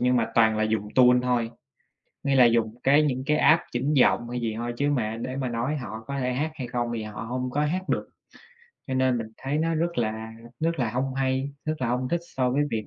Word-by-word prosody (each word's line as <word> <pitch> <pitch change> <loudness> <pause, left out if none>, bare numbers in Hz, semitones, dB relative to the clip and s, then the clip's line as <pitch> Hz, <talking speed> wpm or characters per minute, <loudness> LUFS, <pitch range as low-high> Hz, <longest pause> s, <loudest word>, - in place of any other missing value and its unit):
nhưng 125 +1 +3
mà 115 -1 0
toàn 110 -1 +4
là 110 - +2
dùng 110 -1 -1
tune 125 -1 +6
thôi, 120 -2 0 0.7
nghĩa 140 -1 +1
là 130 -2 +7
dùng 115 -1 +2
cái 145 +3 +5
những 130 -3 -1
cái 150 +1 +2
app 165 +2 +5
chỉnh 130 +5 0
giọng 120 -3 +3
hay 125 0 -3
gì 115 -2 -1
thôi, 120 +1 -3
chứ 145 +2 +1
mà 115 -5 -1
để 130 +2 -4
mà 130 -2 -2
nói 120 +6 -1
họ 110 -4 -7
có 140 0 -3
thể 125 -1 -1
hát 150 +5 -1
hay 130 - -5
không 120 0 -2
thì 110 - -3
họ 105 -1 -7
hông 125 +2 -3
có 145 +3 0
hát 180 +5 -1
được. - - -1 0.8
Cho 130 - -3
nên 130 -1 +2
mình 115 - -4
thấy 140 +3 -2
nó 165 +1 +1
rất 170 -2 -1
là 110 0 -2 0.3
rất 165 0 0
là 120 -4 0
hông 130 +3 -2
hay, 135 +1 -1
rất 155 0 -1
là 120 - +1
hông 125 +1 -1
thích 170 +3 0 0.2
so 125 -1 +2
với 140 +3 +2
việc 110 -1 -2
125 Hz, 250 wpm, -26 LUFS, 115-140 Hz, 0.8 s, là